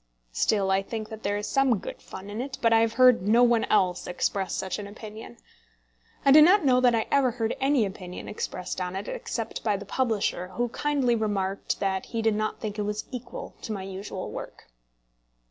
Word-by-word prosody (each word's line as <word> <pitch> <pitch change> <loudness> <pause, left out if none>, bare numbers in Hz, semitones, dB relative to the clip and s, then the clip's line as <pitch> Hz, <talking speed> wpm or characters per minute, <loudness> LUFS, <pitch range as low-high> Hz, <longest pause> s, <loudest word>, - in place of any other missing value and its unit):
Still 195 - +1
I 190 0 +3
think 215 +2 -6
that 220 -1 -8
there 205 0 -1
is 205 - -3
some 265 0 +2
good - - -8
fun 200 +2 -9
in 215 +3 -3
it, 265 0 -5
but 230 -3 +3
I 225 - +6
have 225 0 +2
heard 255 -3 +6
no 235 +3 +5
one 240 -2 +4
else 185 -4 +1
express 190 +2 -1
such 190 +1 -3
an 205 - -6
opinion. 215 +2 -10 0.9
I 275 - +6
do 305 +2 +9
not 360 +3 +6
know 255 -2 +4
that 245 -2 +4
I 225 - 0
ever 275 -2 +4
heard 230 -1 -2
any 270 -4 +3
opinion 185 -2 -7
expressed 185 -3 -4
on 180 0 -3
it, 195 +2 -4
except 230 -2 -4
by 210 -3 +1
the 200 - -8
publisher, 210 -6 -1
who 240 0 0
kindly 275 -1 +1
remarked 200 -3 -1
that 190 -1 -1
he 230 -1 -3
did 220 -1 +3
not 215 +1 -2
think 210 -1 -5
it - - +1
was 210 +1 -3
equal 255 - -7
to 225 - -5
my 195 -2 -5
usual 190 0 -6
work. - - -9
215 Hz, 210 wpm, -27 LUFS, 195-245 Hz, 0.9 s, do